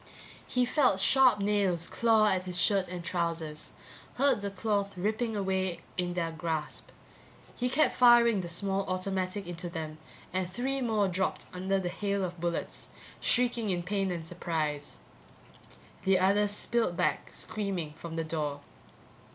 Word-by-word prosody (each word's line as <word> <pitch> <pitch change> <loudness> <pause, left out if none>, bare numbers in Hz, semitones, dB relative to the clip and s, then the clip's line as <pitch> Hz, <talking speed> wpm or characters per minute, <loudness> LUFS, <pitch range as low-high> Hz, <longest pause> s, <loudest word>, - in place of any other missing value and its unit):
He 250 0 +2
felt 255 -6 +3
sharp 255 +2 +5
nails 195 -5 +1
claw 225 -2 +3
at 185 -2 0
his 180 -1 -1
shirt 195 +2 +3
and 180 -1 -6
trousers, 165 -3 -3 0.4
heard 275 -5 +3
the 200 - -2
cloth 200 0 -1
ripping 220 +4 -1
away 190 -2 -1
in 175 -1 -1
their 165 -2 -1
grasp. 160 -1 -3 0.7
He 250 0 -1
kept 295 +5 +3
firing 235 -4 +6
the 175 - -6
small 195 +3 -1
automatic 185 +1 -2
into 175 0 -5
them, 155 -2 -6 0.3
and 185 -1 -1
three 265 +7 -2
more 220 -4 +2
dropped 190 +1 -1
under 190 +2 0
the 180 -2 -2
hail 200 +1 -1
of 175 -2 -7
bullets, 170 -1 -3 0.3
shrieking 240 -3 +2
in 175 -2 0
pain 195 +1 -1
and 170 -2 -4
surprise. 155 -4 -3 1.0
The 190 0 +3
others 200 +3 +3
spilled 210 -3 0
back, - - 0
screaming, 190 -8 -3
from 165 0 -8
the 165 - -1
door. 150 -3 -3
190 Hz, 150 wpm, -30 LUFS, 170-210 Hz, 1.0 s, firing